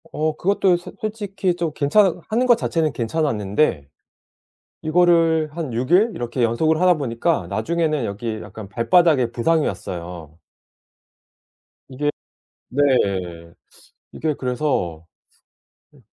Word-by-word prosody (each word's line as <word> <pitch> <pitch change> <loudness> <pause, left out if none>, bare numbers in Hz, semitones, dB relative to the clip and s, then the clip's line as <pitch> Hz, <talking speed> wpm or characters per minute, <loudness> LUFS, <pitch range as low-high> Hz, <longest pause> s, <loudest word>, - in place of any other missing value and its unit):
어 155 0 -1
그것도 190 0 +2
소 175 - -10
솔직히 200 -4 -2
좀 170 -2 -2
괜찮은 165 +6 +3
하는 235 +3 +1
것 240 -2 +6
자체는 160 -8 -1
괜찮았는데. 110 - 0 1.0
이거를 165 -1 +3
한 165 -6 -4
6일 175 - +2
이렇게 120 +1 -3
연속을 155 +8 +1
하다 180 -1 +5
보니까 130 - -1
나중에는 150 - -1
여기 110 +1 -4
약간 110 -2 -10
발바닥에 125 - +3
부상이 155 +7 +1
왔어요. 85 -4 -6 1.5
이게 145 +3 -2 0.6
네. 140 +3 0 1.3
이게 155 -1 -2
그래서 125 - -2 0.9
으 145 - -20
150 Hz, 245 characters per minute, -21 LUFS, 115-170 Hz, 1.5 s, 것